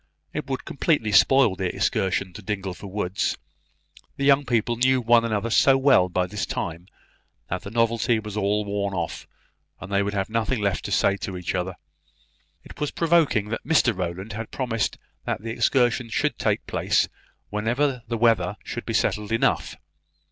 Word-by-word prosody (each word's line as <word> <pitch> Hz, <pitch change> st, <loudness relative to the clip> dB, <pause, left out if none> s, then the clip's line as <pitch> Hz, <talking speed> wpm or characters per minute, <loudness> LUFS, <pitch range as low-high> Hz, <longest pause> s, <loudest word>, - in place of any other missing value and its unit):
It -, -, -4 dB
would 135 Hz, -, -3 dB
completely 140 Hz, -6 st, 0 dB
spoil 130 Hz, 0 st, +5 dB
the 95 Hz, -1 st, -3 dB
excursion 95 Hz, -1 st, 0 dB
to 105 Hz, -, -9 dB
Dingleford 100 Hz, -1 st, -5 dB
woods. 95 Hz, -1 st, -1 dB, 0.8 s
The 140 Hz, -, -1 dB
young 140 Hz, 0 st, +4 dB
people 120 Hz, 0 st, +1 dB
knew 130 Hz, +2 st, +3 dB
one 120 Hz, -1 st, +4 dB
another 115 Hz, 0 st, -1 dB
so 135 Hz, +4 st, +5 dB
well 130 Hz, -9 st, +4 dB
by 90 Hz, 0 st, 0 dB
this 100 Hz, +3 st, -4 dB
time, 85 Hz, +2 st, -4 dB, 0.6 s
that 90 Hz, -, -2 dB
the -, -, -8 dB
novelty 115 Hz, +1 st, +1 dB
was 105 Hz, -1 st, -6 dB
all 105 Hz, 0 st, 0 dB
worn 100 Hz, -1 st, -2 dB
off, 85 Hz, -2 st, -4 dB, 0.5 s
and 95 Hz, -, -9 dB
they 100 Hz, 0 st, +2 dB
would 100 Hz, 0 st, -2 dB
have 95 Hz, -1 st, 0 dB
nothing 115 Hz, +2 st, -1 dB
left 100 Hz, -2 st, -1 dB
to -, -, -4 dB
say 100 Hz, -, +2 dB
to 95 Hz, -2 st, -5 dB
each 90 Hz, -, -3 dB
other. 90 Hz, 0 st, -2 dB, 0.9 s
It -, -, -13 dB
was 150 Hz, -1 st, -1 dB
provoking 160 Hz, -11 st, +2 dB
that 115 Hz, -, -4 dB
Mr 130 Hz, -8 st, +3 dB
Rowland 90 Hz, +4 st, -4 dB
had 110 Hz, +1 st, -5 dB
promised 115 Hz, -5 st, -2 dB, 0.3 s
that -, -, -3 dB
the 115 Hz, -, -4 dB
excursion 120 Hz, +1 st, +1 dB
should -, -, -1 dB
take -, -, 0 dB
place -, -, +1 dB, 0.4 s
whenever 120 Hz, +5 st, 0 dB
the 115 Hz, 0 st, -2 dB
weather 110 Hz, -4 st, +2 dB
should 120 Hz, -, -6 dB
be 115 Hz, -, -1 dB
settled 105 Hz, 0 st, 0 dB
enough. 115 Hz, -, +1 dB
110 Hz, 175 wpm, -24 LUFS, 100-120 Hz, 0.9 s, spoil